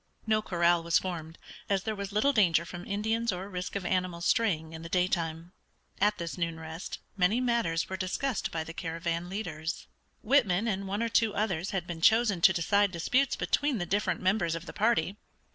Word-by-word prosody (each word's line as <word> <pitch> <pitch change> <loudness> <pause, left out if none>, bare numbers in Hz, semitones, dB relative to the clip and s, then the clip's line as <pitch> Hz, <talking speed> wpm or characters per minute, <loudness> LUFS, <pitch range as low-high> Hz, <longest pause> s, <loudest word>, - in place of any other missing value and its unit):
No 215 -1 +2
corral 175 -3 +2
was 170 0 +3
formed, 165 -3 -4 0.3
as 195 -1 +1
there 220 - -2
was 200 -1 -5
little 260 +8 +2
danger 170 - +3
from 175 0 -8
Indians 220 +3 0
or 185 +1 -5
risk 180 -1 -5
of 195 -2 -3
animals 180 -2 -1
straying 165 -8 +1
in 160 - -7
the 165 - -8
daytime. 170 -2 -1 0.5
At 210 +1 +3
this 170 +1 -5
noon 165 -1 -2
rest 160 +2 -6 0.2
many 200 +5 +2
matters 235 -10 0
were 190 - -4
discussed 195 +6 -2
by 160 -1 -3
the 165 - -8
caravan 170 +1 -3
leaders. 165 -5 -4 0.4
Whitman 225 -5 +3
and 195 -2 -2
one 200 +4 -1
or 230 - 0
two 225 -2 +2
others 190 -4 -1
had 190 -3 -2
been 170 -2 -6
chosen 220 -3 +4
to 190 - +7
decide 200 +3 +2
disputes 250 +10 +1
between 285 -4 0
the 175 - -2
different 200 +3 0
members 185 -3 +1
of 165 +1 -6
the - - -8
party. 210 -3 +1
185 Hz, 195 wpm, -29 LUFS, 170-210 Hz, 0.5 s, to